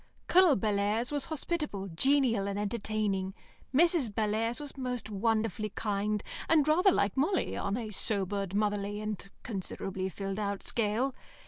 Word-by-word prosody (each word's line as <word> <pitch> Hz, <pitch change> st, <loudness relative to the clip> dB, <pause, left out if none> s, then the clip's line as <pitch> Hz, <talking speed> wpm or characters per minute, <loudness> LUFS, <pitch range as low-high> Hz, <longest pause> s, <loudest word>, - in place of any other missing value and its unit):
Colonel 360 Hz, -5 st, +6 dB
Bellairs 210 Hz, +4 st, 0 dB
was 290 Hz, -2 st, 0 dB
hospitable, 300 Hz, -, -3 dB
genial, 235 Hz, -, +2 dB
and 200 Hz, 0 st, -2 dB
entertaining; 205 Hz, -2 st, -1 dB, 0.4 s
Mrs. 320 Hz, -2 st, +3 dB
Bellairs 220 Hz, +3 st, 0 dB
was 290 Hz, -2 st, -7 dB
most 250 Hz, -4 st, -4 dB
wonderfully 215 Hz, +1 st, 0 dB
kind, 210 Hz, 0 st, -1 dB, 0.3 s
and 310 Hz, -3 st, +4 dB
rather 360 Hz, +6 st, +5 dB
like 200 Hz, -, +1 dB
Molly 320 Hz, +8 st, +1 dB
on 200 Hz, -, -1 dB
a 225 Hz, -3 st, -4 dB
sobered, 200 Hz, -1 st, +1 dB
motherly, 205 Hz, 0 st, 0 dB
and 210 Hz, -2 st, -5 dB
considerably 190 Hz, -2 st, -4 dB
filled 195 Hz, +2 st, -4 dB
out 200 Hz, -1 st, -2 dB
scale. 230 Hz, +4 st, 0 dB
215 Hz, 135 wpm, -30 LUFS, 200-265 Hz, 0.4 s, Colonel